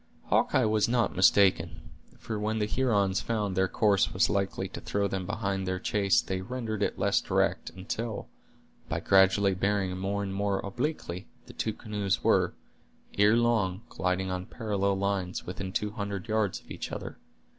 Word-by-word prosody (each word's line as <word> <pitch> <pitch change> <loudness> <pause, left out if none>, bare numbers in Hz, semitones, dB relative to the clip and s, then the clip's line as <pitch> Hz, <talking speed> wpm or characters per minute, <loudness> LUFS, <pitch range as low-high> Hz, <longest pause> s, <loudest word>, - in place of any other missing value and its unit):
Hawkeye - - +3
was 110 0 +2
not 120 -1 +1
mistaken; 95 +1 +3 0.3
for 110 -2 -5
when 110 +1 -1
the 105 - +1
Hurons 105 -5 +1
found 105 -3 -1
their 95 +1 +3
course 100 -1 +2
was - - +2
likely 100 -1 -1
to - - -8
throw 100 0 0
them 95 -1 -3
behind 100 -3 -2
their 95 0 -1
chase 100 +1 +2
they 95 -1 -3
rendered 110 -1 -4
it - - 0
less - - +2
direct, - - 0
until, 100 +5 -5 0.6
by - - -1
gradually 95 0 +4
bearing 95 0 0
more 100 +2 -2
and 95 -1 -4
more 100 0 0
obliquely, 100 - -4 0.2
the - - -12
two 110 - -2
canoes 105 -3 -2
were, - - +3 0.6
ere 105 +3 +6
long, 110 -5 +1
gliding 95 +1 -1
on 90 0 -4
parallel 100 -4 -1
lines, 95 -2 -2
within 95 +1 -5
two 105 +2 -1
hundred 100 -2 -4
yards 110 -3 0
of - - -18
each - - -5
other. - - -6
100 Hz, 165 wpm, -29 LUFS, 95-105 Hz, 0.6 s, ere